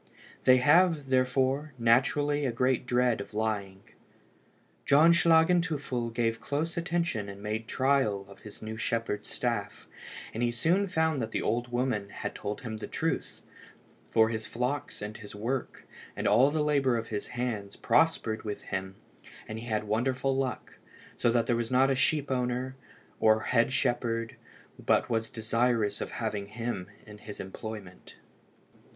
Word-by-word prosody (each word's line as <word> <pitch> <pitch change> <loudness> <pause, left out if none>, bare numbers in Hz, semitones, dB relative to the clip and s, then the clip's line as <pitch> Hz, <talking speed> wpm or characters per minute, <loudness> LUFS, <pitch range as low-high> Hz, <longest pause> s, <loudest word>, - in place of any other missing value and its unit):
They 130 0 +7
have, 150 +1 +4
therefore, 130 +3 +1
naturally 140 +5 +2
a 130 - +1
great 125 +1 +1
dread 125 -3 +2
of 100 - -10
lying. 100 -3 -2 1.0
John 155 +4 +6
Schlagenteufel 160 -7 +2
gave 115 0 -1
close 155 +4 -2
attention 170 -11 -1
and 100 0 -9
made 110 +1 -3
trial 130 -8 +1
of 100 - -14
his 105 0 -12
new 110 0 -5
shepherd's 115 -2 -2
staff, 115 -5 -3 0.5
and 115 - -4
he 120 - +2
soon 170 +12 +1
found 160 -5 +1
that 110 - -2
the - - -2
old 120 +3 -1
woman 120 -5 -1
had - - -5
told 105 0 -5
him 110 -3 -5
the 110 - -6
truth, - - -3 0.7
for 110 0 +4
his 110 -1 -3
flocks 125 -1 -3
and 105 +1 -6
his 105 -2 -10
work, 120 +5 -3 0.3
and - - -1
all 130 +4 +5
the 150 0 0
labour 140 -5 +2
of 115 0 -5
his 105 -2 -3
hands, 110 -5 -3
prospered 110 -9 +2
with 105 -1 -5
him, 95 0 -4 0.5
and 110 +1 -5
he 120 - -8
had 110 -2 0
wonderful 130 +5 0
luck, 130 -1 -3 0.4
so 120 - +2
that 115 -1 +2
there 120 -1 +1
was 115 -1 -2
not 130 +2 +4
a - - +2
sheep 140 +1 +1
owner 125 +1 -1 0.4
or 110 0 +4
head 120 +2 +2
shepherd 120 -3 0 0.5
but - - +2
was 115 -1 0
desirous 115 -1 0
of - - -5
having 105 -3 -3
him 110 -4 -4 0.2
in 105 -1 -12
his 105 -1 -9
employment. 95 -1 -8
120 Hz, 155 wpm, -29 LUFS, 110-135 Hz, 1.0 s, They